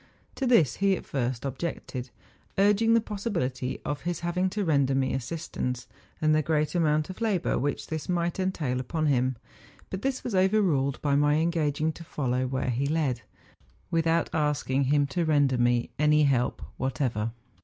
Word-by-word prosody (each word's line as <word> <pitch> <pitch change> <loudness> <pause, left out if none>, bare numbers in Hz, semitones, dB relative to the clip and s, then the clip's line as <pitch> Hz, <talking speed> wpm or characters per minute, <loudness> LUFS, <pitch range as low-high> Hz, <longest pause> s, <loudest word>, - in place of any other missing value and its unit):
To 265 - -2
this 175 - +4
he 195 -1 +3
at - - -10
first 125 -2 -2
objected, 135 -2 -4 0.5
urging 210 +3 +4
the 230 - +4
possibility 170 - -3
of 145 -1 -3
his 175 -1 -3
having 180 +2 0
to 205 +1 -2
render 140 -4 +2
me 130 -1 +1
assist¬ 145 +5 -5
ance, 125 -1 -2 0.3
and 155 0 +3
the 155 - +3
great 155 0 0
amount 155 -1 +1
of 185 - -12
labour 205 -6 +1
wliich 145 +1 -1
this 160 0 -5
might 175 0 0
entail 155 -9 -1
upon 155 +5 -2
him; 130 -3 +2 0.6
but 190 - -4
this 265 -1 -1
was 245 - -4
overruled 185 -8 +2
by 140 -1 +2
my 145 +1 +3
engaging 160 -1 +1
to 165 - -11
follow 130 -5 -1
where 130 0 -1
he 130 +4 0
led, 145 -6 0 0.7
without 165 0 +2
asking 145 -3 +1
him 145 +1 +3
to 155 +5 -1
render 145 -5 +2
me 120 0 +2
any 150 0 +4
help 130 -4 +1
whatever. 125 -4 -1
150 Hz, 170 wpm, -27 LUFS, 130-175 Hz, 0.7 s, this